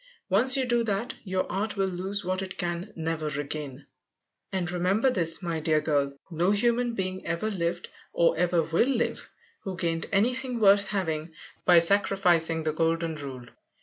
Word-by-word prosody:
Once 250 Hz, +8 st, +5 dB
you 265 Hz, -, +1 dB
do 240 Hz, -1 st, +1 dB
that, 220 Hz, +2 st, -2 dB
your 185 Hz, -2 st, -1 dB
art 205 Hz, +1 st, -2 dB
will 195 Hz, -, +2 dB
lose 190 Hz, +2 st, -3 dB
what 185 Hz, +1 st, -1 dB
it 190 Hz, 0 st, -7 dB
can 175 Hz, +3 st, -3 dB
never 160 Hz, -1 st, -3 dB
regain. 145 Hz, -1 st, -5 dB, 0.7 s
And 180 Hz, -2 st, -2 dB
remember 190 Hz, +8 st, +2 dB
this, 165 Hz, -4 st, +1 dB
my 165 Hz, -2 st, -2 dB
dear 155 Hz, 0 st, +2 dB
girl, 145 Hz, -3 st, 0 dB, 0.2 s
no 170 Hz, +3 st, +1 dB
human 235 Hz, +3 st, +1 dB
being 185 Hz, -1 st, -3 dB
ever 170 Hz, +6 st, -2 dB
lived 175 Hz, -2 st, -2 dB, 0.2 s
or 170 Hz, -, +2 dB
ever 175 Hz, -1 st, +2 dB
will 165 Hz, +9 st, +1 dB
live 245 Hz, -3 st, -1 dB, 0.3 s
who 190 Hz, -2 st, -6 dB
gained 165 Hz, -2 st, -1 dB
anything 245 Hz, +4 st, 0 dB
worth 200 Hz, -1 st, +5 dB
having 160 Hz, -5 st, -3 dB, 0.3 s
_by 175 Hz, -2 st, +8 dB
sacrificing 175 Hz, -4 st, +2 dB
the 155 Hz, -1 st, -1 dB
golden 165 Hz, +1 st, 0 dB
rule. 135 Hz, -5 st, -7 dB
180 Hz, 165 wpm, -27 LUFS, 165-200 Hz, 0.7 s, by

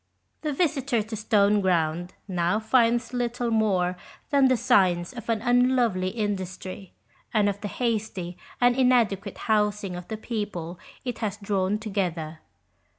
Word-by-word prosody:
The 305 Hz, -, -1 dB
visitor 275 Hz, -7 st, +1 dB
to 220 Hz, +1 st, -6 dB
Stoneground 190 Hz, -6 st, +2 dB, 0.2 s
now 180 Hz, +2 st, +1 dB
finds 235 Hz, +1 st, +2 dB
little 245 Hz, -1 st, -1 dB
more 190 Hz, -5 st, +1 dB, 0.3 s
than 280 Hz, -2 st, +5 dB
the 255 Hz, -1 st, +3 dB
signs 180 Hz, -1 st, +3 dB
of 235 Hz, -2 st, -9 dB
an 225 Hz, -1 st, 0 dB
unlovely 245 Hz, -6 st, +3 dB
industry, 190 Hz, -2 st, -4 dB, 0.4 s
and 210 Hz, -1 st, +4 dB
of 200 Hz, 0 st, -2 dB
the 205 Hz, -, -3 dB
hasty 210 Hz, -5 st, -2 dB, 0.2 s
and 245 Hz, 0 st, +4 dB
inadequate 245 Hz, -6 st, +2 dB
housing 210 Hz, -3 st, 0 dB
of 180 Hz, 0 st, -8 dB
the 220 Hz, -, -4 dB
people 200 Hz, -7 st, -4 dB, 0.3 s
it 245 Hz, -3 st, -3 dB
has 210 Hz, -3 st, -2 dB
drawn 200 Hz, -1 st, 0 dB
together. 175 Hz, -7 st, -3 dB
210 Hz, 135 wpm, -26 LUFS, 185-235 Hz, 0.4 s, than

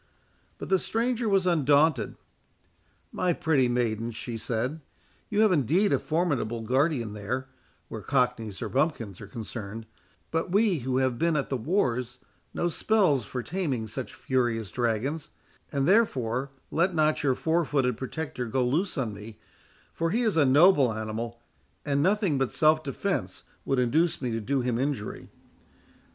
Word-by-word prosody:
But -, -, -7 dB
the 190 Hz, -1 st, +4 dB
stranger 235 Hz, +2 st, -1 dB
was 195 Hz, -2 st, +3 dB
undaunted. 150 Hz, -, +3 dB, 1.0 s
"My 180 Hz, -1 st, +1 dB
pretty 145 Hz, -6 st, +2 dB
maiden," 115 Hz, -2 st, 0 dB
she 115 Hz, +1 st, -6 dB
said, 125 Hz, +7 st, -2 dB, 0.5 s
"you 210 Hz, 0 st, +2 dB
have 215 Hz, -2 st, +5 dB
indeed 175 Hz, -, +2 dB
a -, -, +3 dB
formidable 145 Hz, -9 st, -1 dB
guardian 125 Hz, -1 st, +1 dB
there, 125 Hz, +6 st, -4 dB, 0.4 s
where -, -, -7 dB
cockneys 125 Hz, -6 st, 0 dB
or -, -, -3 dB
bumpkins 125 Hz, -, -1 dB
are 105 Hz, -, -8 dB
concerned; 110 Hz, 0 st, -7 dB, 0.5 s
but 165 Hz, +2 st, -1 dB
we 200 Hz, -4 st, +3 dB
who 130 Hz, +1 st, -1 dB
have 130 Hz, -2 st, +1 dB
been 165 Hz, -1 st, +2 dB
at 140 Hz, -, -1 dB
the 135 Hz, -, -1 dB
wars 125 Hz, -, 0 dB, 0.3 s
know 175 Hz, -, -1 dB
spells 175 Hz, -, +2 dB
for 125 Hz, +4 st, -4 dB
taming 150 Hz, -10 st, -2 dB
such 120 Hz, +4 st, -6 dB
furious 120 Hz, -5 st, -1 dB
dragons; 125 Hz, +6 st, -1 dB, 0.4 s
and 140 Hz, -1 st, 0 dB
therefore 135 Hz, -, +2 dB, 0.2 s
let 175 Hz, +2 st, +1 dB
not 155 Hz, -1 st, +2 dB
your 135 Hz, -3 st, +2 dB
four 165 Hz, +4 st, +1 dB
footed 135 Hz, -5 st, +1 dB
protector 130 Hz, -1 st, -4 dB
go 125 Hz, +3 st, 0 dB
loose 165 Hz, +10 st, 0 dB
on 120 Hz, -6 st, -1 dB
me, 105 Hz, +2 st, -10 dB, 0.6 s
for 165 Hz, 0 st, -1 dB
he 235 Hz, +7 st, +1 dB
is 220 Hz, -6 st, +1 dB
a 155 Hz, -3 st, +4 dB
noble 140 Hz, -1 st, +5 dB
animal, 110 Hz, +2 st, -4 dB, 0.5 s
and 140 Hz, -1 st, +1 dB
nothing 190 Hz, -4 st, +2 dB
but 135 Hz, -, 0 dB
self 155 Hz, 0 st, +3 dB
defence 135 Hz, -3 st, -3 dB, 0.2 s
would 135 Hz, -, 0 dB
induce 155 Hz, +7 st, +2 dB
me 125 Hz, -3 st, -2 dB
to 115 Hz, 0 st, -2 dB
do 135 Hz, +5 st, 0 dB
him 120 Hz, -1 st, -1 dB
injury." 135 Hz, -6 st, -3 dB
135 Hz, 155 wpm, -27 LUFS, 120-165 Hz, 1.0 s, have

